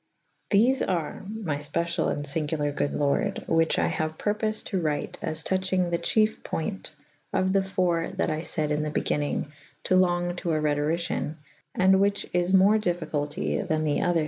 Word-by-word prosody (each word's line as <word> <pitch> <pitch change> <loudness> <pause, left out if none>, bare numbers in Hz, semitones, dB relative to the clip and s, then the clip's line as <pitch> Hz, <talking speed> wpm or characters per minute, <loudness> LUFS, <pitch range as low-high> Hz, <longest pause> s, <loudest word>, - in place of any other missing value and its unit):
Thefe 240 +6 +4
are 170 -5 -2
my 205 -9 -3
fpeciall 170 +4 -1
and 145 - -3
finguler 145 0 -1
goode 145 - -1
Lorde 140 -1 0
whiche 165 0 +2
I - - +2
haue 155 0 -1
purpofed 215 +6 -2
to 190 -3 0
wryte 150 -2 -2
as 155 0 -2
touchyng 185 -1 0
the 170 - +1
cheyf 215 0 +1
poynt 195 +4 -3 0.4
of 185 0 +1
Me 195 - +4
.iiii. 185 -2 -1
that - - +1
I 155 0 -2
fayd 155 -2 -2
in 150 0 +1
the 150 - -2
begynnyng 145 -1 -1 0.3
to 185 - +2
long 175 -1 +2
to 175 -3 -1
a 155 - +1
Rhetoricien 150 +1 -1 0.2
/ - - -37
and 190 +1 +5
which 200 0 +1
is 175 +1 +1
more 195 +3 +5
dif 175 -4 0
ficulty 145 -2 -2
tha« 155 - +1
the 155 -2 0
other 175 -1 +2
170 Hz, 180 wpm, -26 LUFS, 155-190 Hz, 0.4 s, and